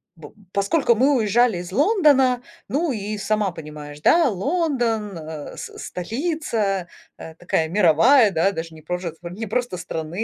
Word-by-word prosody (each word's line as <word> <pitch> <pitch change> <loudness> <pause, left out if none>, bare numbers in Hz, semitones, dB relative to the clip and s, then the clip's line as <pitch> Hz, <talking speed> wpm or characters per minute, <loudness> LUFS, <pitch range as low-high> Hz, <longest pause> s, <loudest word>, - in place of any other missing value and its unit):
бу 165 +5 -13 0.2
поскольку 235 +7 +2
мы 270 +5 +3
уезжали 225 -1 +2
из 175 +1 -7
Лондона, 275 - +3 0.3
ну, 310 +3 0
и 210 -2 -4
сама 210 0 0
понимаешь, 150 -2 -9
да, 330 - +4
Лондон, 235 - -1
э, 155 -2 -8
с - - -5
с - - -7
столица, 220 - -2 0.3
э, 160 - -10
такая 165 -1 -1
мировая, 210 - +5
да, 175 +3 +2
даже 165 -3 -6
не 155 - -13
прожец 175 0 -4
а 170 - -5
не 215 +6 -6
просто 240 -2 -2
страны, 165 -1 -6
205 Hz, 160 wpm, -22 LUFS, 170-250 Hz, 0.3 s, мировая